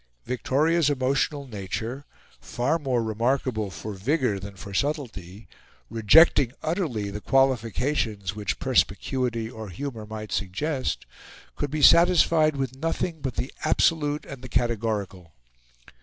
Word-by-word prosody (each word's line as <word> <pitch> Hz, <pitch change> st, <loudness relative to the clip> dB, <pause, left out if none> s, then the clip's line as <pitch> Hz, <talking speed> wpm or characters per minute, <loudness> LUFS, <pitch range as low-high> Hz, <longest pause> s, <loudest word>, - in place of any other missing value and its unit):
Victoria's 150 Hz, +5 st, +1 dB
emotional 140 Hz, +1 st, 0 dB
nature, 110 Hz, +5 st, -5 dB, 0.3 s
far 140 Hz, +7 st, -1 dB
more 130 Hz, -5 st, 0 dB
remarkable 115 Hz, -1 st, -1 dB
for 105 Hz, +3 st, -7 dB
vigour 120 Hz, -, 0 dB
than 100 Hz, +1 st, -9 dB
for 100 Hz, +1 st, -9 dB
subtlety, 110 Hz, -, -3 dB, 0.4 s
rejecting 120 Hz, -, +5 dB
utterly 150 Hz, -, -2 dB
the 105 Hz, +1 st, -6 dB
qualifications 115 Hz, -5 st, +1 dB
which 105 Hz, -2 st, -2 dB
perspicuity, 120 Hz, -4 st, 0 dB
or 110 Hz, -3 st, -8 dB
humour, 110 Hz, +2 st, -6 dB
might 110 Hz, 0 st, -7 dB
suggest, 130 Hz, -, -2 dB, 0.5 s
could 145 Hz, -, -3 dB
be 150 Hz, +1 st, -2 dB
satisfied 165 Hz, -2 st, +6 dB
with 135 Hz, -2 st, -3 dB
nothing 165 Hz, +2 st, -2 dB
but 130 Hz, -4 st, -3 dB
the 130 Hz, -, -3 dB
absolute 150 Hz, -3 st, +1 dB
and 135 Hz, -2 st, -9 dB
the 130 Hz, -, -9 dB
categorical. 105 Hz, -8 st, -2 dB
125 Hz, 120 wpm, -25 LUFS, 105-145 Hz, 0.5 s, satisfied